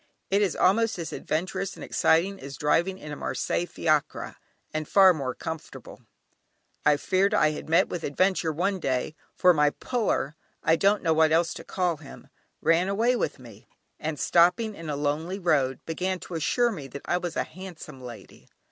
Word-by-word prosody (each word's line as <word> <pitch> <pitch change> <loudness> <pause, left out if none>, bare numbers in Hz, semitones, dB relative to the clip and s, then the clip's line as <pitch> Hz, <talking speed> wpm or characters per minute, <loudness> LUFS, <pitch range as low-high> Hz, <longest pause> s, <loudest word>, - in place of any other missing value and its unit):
It 200 +1 +3
is 200 - +1
almost 225 +4 +2
as 170 -2 -5
adventurous 180 +4 -3
and - - -9
exciting 190 +5 +2
as 140 0 -8
driving 170 +6 +1
in 150 -5 -9
a - - -4
Marseilles 175 +4 -2
Fiacre, 155 -2 -1 0.4
and 155 -1 -3
far 190 -2 +7
more 135 -5 -3
comfortable. 160 -1 -8 0.8
I 150 -1 +4
feared 185 +6 +1
I 155 - +4
had 155 - -7
met 165 - +4
with 175 - -5
an - - -2
adventure 185 0 +1
one 190 +5 -1
day, 130 -1 -1 0.2
for 180 -1 +5
my 150 -2 +4
"puller" 210 - -2 0.3
(I 160 - +4
don't 200 +4 +2
know 160 - +3
what 160 0 +4
else 165 0 +2
to - - -9
call 180 -3 -1
him) 145 -2 -13 0.3
ran 165 +3 +3
away 230 +5 +2
with - - -2
me, 115 -5 -14 0.3
and 155 -1 -4
stopping 180 +6 +3
in 165 -5 -8
a 145 - -1
lonely 150 +6 -2
road, 140 -8 +1
began 185 +3 -2
to - - -9
assure 235 +9 +1
me 150 -10 -7
that 140 +2 -9
I 175 - +1
was 175 -2 -5
a - - +2
"handsome 165 -6 -10
lady." 120 -3 -11
165 Hz, 185 wpm, -26 LUFS, 150-185 Hz, 0.8 s, far